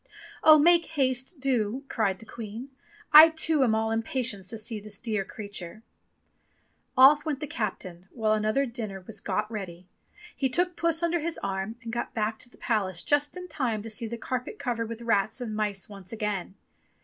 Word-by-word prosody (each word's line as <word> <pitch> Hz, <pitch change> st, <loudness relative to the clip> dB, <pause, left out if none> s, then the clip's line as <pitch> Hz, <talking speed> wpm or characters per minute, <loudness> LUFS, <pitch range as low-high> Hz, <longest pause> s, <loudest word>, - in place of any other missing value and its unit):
"Oh, 310 Hz, -1 st, +9 dB
make 335 Hz, +2 st, +5 dB
haste, 265 Hz, +1 st, -1 dB
do!" 255 Hz, -1 st, 0 dB
cried 200 Hz, -7 st, 0 dB
the 225 Hz, -, -14 dB
Queen, 230 Hz, +4 st, -8 dB, 0.4 s
"I, 310 Hz, +2 st, +12 dB
too, 315 Hz, -2 st, +1 dB
am 225 Hz, -4 st, +3 dB
all 220 Hz, 0 st, 0 dB
impatience 225 Hz, -3 st, -1 dB
to 225 Hz, -, -2 dB
see 215 Hz, 0 st, -3 dB
this 205 Hz, -1 st, -7 dB
dear 215 Hz, -3 st, -2 dB
creature." 200 Hz, 0 st, -8 dB, 1.1 s
Off 285 Hz, +3 st, +8 dB
went 295 Hz, -4 st, -2 dB
the 300 Hz, -, -3 dB
captain, 190 Hz, -, -5 dB
while 220 Hz, -3 st, +1 dB
another 215 Hz, +6 st, +1 dB
dinner 220 Hz, -6 st, -6 dB
was 225 Hz, -, -5 dB
got 210 Hz, +2 st, -2 dB
ready. 185 Hz, -5 st, -6 dB, 0.5 s
He 265 Hz, -, 0 dB
took 355 Hz, +6 st, +1 dB
Puss 335 Hz, 0 st, +1 dB
under 340 Hz, 0 st, +1 dB
his 330 Hz, +1 st, -2 dB
arm 195 Hz, +3 st, -3 dB
and 230 Hz, -1 st, -6 dB
got 240 Hz, +2 st, -3 dB
back 220 Hz, 0 st, -1 dB
to 245 Hz, -, -6 dB
the -, -, -20 dB
palace 190 Hz, -7 st, -1 dB
just 290 Hz, +3 st, +1 dB
in 360 Hz, 0 st, -7 dB
time 250 Hz, -10 st, -2 dB
to 225 Hz, -, -6 dB
see 230 Hz, +1 st, -3 dB
the 235 Hz, +1 st, -5 dB
carpet 250 Hz, +1 st, -4 dB
covered 235 Hz, -5 st, -2 dB
with 230 Hz, 0 st, -7 dB
rats 215 Hz, 0 st, +1 dB
and 225 Hz, -4 st, -4 dB
mice 210 Hz, -3 st, -2 dB
once 195 Hz, -3 st, -11 dB
again. 210 Hz, -4 st, -3 dB
225 Hz, 185 wpm, -27 LUFS, 210-275 Hz, 1.1 s, I